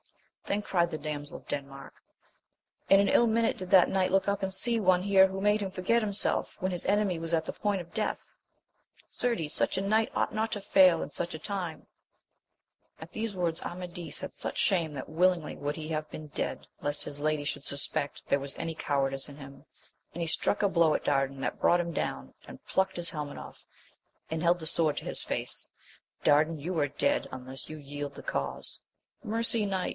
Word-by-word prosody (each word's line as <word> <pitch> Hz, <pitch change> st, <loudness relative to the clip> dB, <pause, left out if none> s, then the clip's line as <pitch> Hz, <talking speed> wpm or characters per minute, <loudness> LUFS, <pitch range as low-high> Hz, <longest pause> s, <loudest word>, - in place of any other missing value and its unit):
Then 205 Hz, +1 st, 0 dB
cried 170 Hz, -4 st, +1 dB
the 155 Hz, -, -2 dB
damsel 145 Hz, -1 st, -5 dB
of -, -, -18 dB
Denmark, 135 Hz, -1 st, -6 dB, 1.0 s
In 195 Hz, -, +8 dB
an 200 Hz, -, +4 dB
ill 235 Hz, -, +5 dB
minute 225 Hz, 0 st, +2 dB
did 185 Hz, -1 st, -6 dB
that 185 Hz, -2 st, +7 dB
knight 190 Hz, -1 st, +1 dB
look 195 Hz, +1 st, +3 dB
up 200 Hz, 0 st, 0 dB
and 190 Hz, 0 st, -1 dB
see 230 Hz, +4 st, +3 dB
one 185 Hz, -2 st, +4 dB
here 195 Hz, -1 st, +6 dB
who 190 Hz, 0 st, -5 dB
made 210 Hz, +1 st, +3 dB
him 195 Hz, -2 st, -2 dB
forget 190 Hz, +6 st, +2 dB
himself 205 Hz, -1 st, -1 dB
when 185 Hz, +1 st, 0 dB
his 175 Hz, -, -4 dB
enemy 200 Hz, -4 st, +2 dB
was 165 Hz, 0 st, -3 dB
at 160 Hz, -1 st, +2 dB
the -, -, -4 dB
point 205 Hz, -2 st, 0 dB
of 170 Hz, -1 st, -9 dB
death! 215 Hz, -1 st, -3 dB, 0.7 s
Certes 210 Hz, -12 st, -1 dB
such -, -, +1 dB
a -, -, +1 dB
knight 215 Hz, +3 st, +2 dB
ought -, -, 0 dB
not 220 Hz, +1 st, 0 dB
to 205 Hz, -, -2 dB
fail 190 Hz, -4 st, +5 dB
in -, -, -6 dB
such 170 Hz, +4 st, -3 dB
a 160 Hz, -, -5 dB
time! 180 Hz, -3 st, -4 dB, 1.1 s
At -, -, -10 dB
these 220 Hz, -1 st, -2 dB
words 175 Hz, -2 st, -1 dB
Amadis 175 Hz, -3 st, -5 dB
had 190 Hz, -, -6 dB
such -, -, -4 dB
shame 170 Hz, -5 st, +2 dB
that 135 Hz, -2 st, -6 dB
willingly 170 Hz, 0 st, +2 dB
would 145 Hz, +2 st, -3 dB
he 155 Hz, -1 st, -5 dB
have 155 Hz, -1 st, -2 dB
been 155 Hz, -, -8 dB
dead -, -, -3 dB
le.st 145 Hz, 0 st, -1 dB
his 145 Hz, 0 st, -5 dB
lady 155 Hz, -1 st, +1 dB
should 140 Hz, -, -3 dB
suspect 140 Hz, +1 st, -2 dB
there 140 Hz, -, +3 dB
was 140 Hz, 0 st, -5 dB
any 165 Hz, 0 st, -3 dB
cowardice 135 Hz, -2 st, -1 dB
in 140 Hz, -, -11 dB
him, 140 Hz, -1 st, -11 dB, 0.5 s
and 175 Hz, -, -7 dB
he 165 Hz, -, -1 dB
struck 160 Hz, -, +1 dB
a -, -, +6 dB
blow 170 Hz, -4 st, +4 dB
at -, -, -2 dB
Dardan 135 Hz, -1 st, +1 dB
that -, -, -3 dB
brought 175 Hz, -, +5 dB
him 170 Hz, -1 st, -2 dB
down; 65 Hz, -, -3 dB
and -, -, -12 dB
plucked 190 Hz, -1 st, +1 dB
his 175 Hz, -1 st, -3 dB
helmet 150 Hz, -2 st, -5 dB
off, -, -, -10 dB, 0.7 s
and 160 Hz, 0 st, -2 dB
held 175 Hz, +1 st, +4 dB
the 160 Hz, -, -4 dB
sword 155 Hz, -2 st, +2 dB
to -, -, -4 dB
his -, -, -4 dB
face, -, -, -3 dB, 0.3 s
— -, -, -35 dB
Dardan^ 155 Hz, +2 st, +4 dB
you 170 Hz, +4 st, -3 dB
are 145 Hz, -, +3 dB
dead, 285 Hz, -, +1 dB
unless 130 Hz, +1 st, -7 dB
you 155 Hz, -, -6 dB
yield 145 Hz, 0 st, -6 dB
the -, -, -9 dB
cause! -, -, -3 dB, 0.4 s
Mercy, 230 Hz, 0 st, +1 dB
knight 190 Hz, -2 st, -1 dB
170 Hz, 210 wpm, -30 LUFS, 150-195 Hz, 1.1 s, In